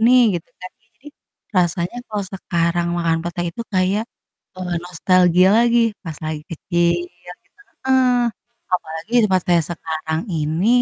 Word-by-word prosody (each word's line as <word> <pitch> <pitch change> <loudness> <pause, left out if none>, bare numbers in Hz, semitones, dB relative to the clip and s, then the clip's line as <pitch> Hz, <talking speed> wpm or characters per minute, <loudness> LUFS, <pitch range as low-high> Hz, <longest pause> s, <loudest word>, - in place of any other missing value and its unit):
nih, 250 0 +7 0.2
gitu - - -38
kan, 185 - -8
ya 225 - -36
jadi 285 - -13 0.5
rasanya 175 +4 +1
kalau 210 -2 -2
sekarang 170 -2 0
makan 165 -1 +1
pete 175 0 -4
itu 235 - -7
kayak, 190 +4 +2 0.6
eee, 180 -1 -3
nostalgia 180 +1 +4
lagi, 235 0 +4 0.2
pas 160 -4 -6
lagi 155 -1 -3
kecil 170 +1 +1 0.4
gitu. - - -18 0.3
Heeh. 260 0 +4 0.7
Apalagi 165 +5 -3
tempat 185 -2 +2
saya 175 -1 +4
sekarang 160 0 -3
ini, 160 +5 0
175 Hz, 140 wpm, -20 LUFS, 165-190 Hz, 0.7 s, nih